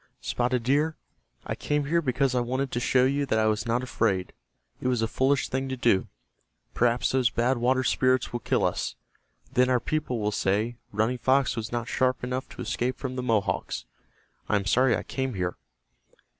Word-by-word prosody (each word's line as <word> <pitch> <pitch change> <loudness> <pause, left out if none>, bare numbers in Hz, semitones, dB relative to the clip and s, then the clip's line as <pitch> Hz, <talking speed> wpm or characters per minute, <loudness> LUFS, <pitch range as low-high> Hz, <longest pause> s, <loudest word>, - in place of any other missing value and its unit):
"Spotted 125 0 -1
Deer, 150 +6 +2 0.5
I - - -2
came 150 -1 -1
here 170 +4 +2
because 135 -2 +1
I 125 - +2
wanted 130 +3 -1
to 120 - -1
show 125 +1 +3
you 140 +1 +1
that 110 - +1
I 110 - +3
was 110 +1 0
not 120 +2 +1
afraid. 100 -7 0 0.5
It - - -1
was 125 -3 +1
a - - +1
foolish 135 +4 +1
thing 135 +1 -2
to 130 - -3
do. 115 -6 +2 0.7
Perhaps 120 0 +2
those 130 -3 +3
Bad 120 +2 +1
Water 130 +2 +2
Spirits 130 0 +2
will 120 - -1
kill - - +1
us. - - -1 0.6
Then 125 -1 +4
our 125 -1 +3
people 150 -1 -2
will 105 -1 0
say, 105 +4 0
'Running 110 +4 0
Fox 130 +1 +2
was 115 -1 -4
not 120 -1 -2
sharp 130 0 0
enough 125 +1 -3
to - - -7
escape 120 +3 -1
from 130 -2 -4
the 130 - -2
Mohawks.' 115 -5 -1 0.6
I - - +3
am 100 -1 0
sorry 125 +3 +3
I - - -5
came 130 -3 -3
here." 90 -1 -2
125 Hz, 195 wpm, -27 LUFS, 115-130 Hz, 0.7 s, Then